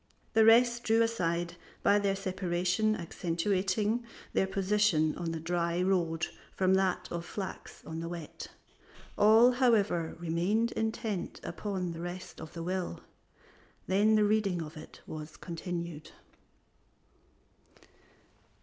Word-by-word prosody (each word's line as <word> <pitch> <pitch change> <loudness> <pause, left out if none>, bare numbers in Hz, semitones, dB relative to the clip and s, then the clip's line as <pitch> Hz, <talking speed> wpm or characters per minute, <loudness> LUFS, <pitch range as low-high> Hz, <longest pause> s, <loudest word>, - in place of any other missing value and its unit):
The 220 -1 +6
rest 235 +1 +5
drew 225 +1 +4
aside, 175 -6 -1 0.3
by 205 - +5
their 200 -1 +1
separation 185 +2 0
accentuating 190 +6 -1 0.3
their 190 - +2
position 190 -5 +2
on 170 -1 -3
the 165 0 -3
dry 170 +1 -1
road 170 -4 +1 0.3
from 190 0 +3
that 190 -1 +1
of 170 0 -3
Flachs 190 +2 -7
on 160 0 -5
the 165 0 -4
wet; 170 -3 -7 0.7
all, 220 +4 +7
however, 215 -10 +2
remained 180 +8 +1
intent 220 -3 -3
upon 190 -4 -3
the 165 0 -7
rest 180 0 -7
of 160 - -9
the 165 - -5
will. 185 +1 -3 0.8
Then 205 +3 +3
the 215 - +4
reading 205 -4 +1
of 155 0 -10
it 155 - -11
was 155 0 -8
continued. 170 -2 -5
185 Hz, 120 wpm, -31 LUFS, 170-210 Hz, 0.8 s, all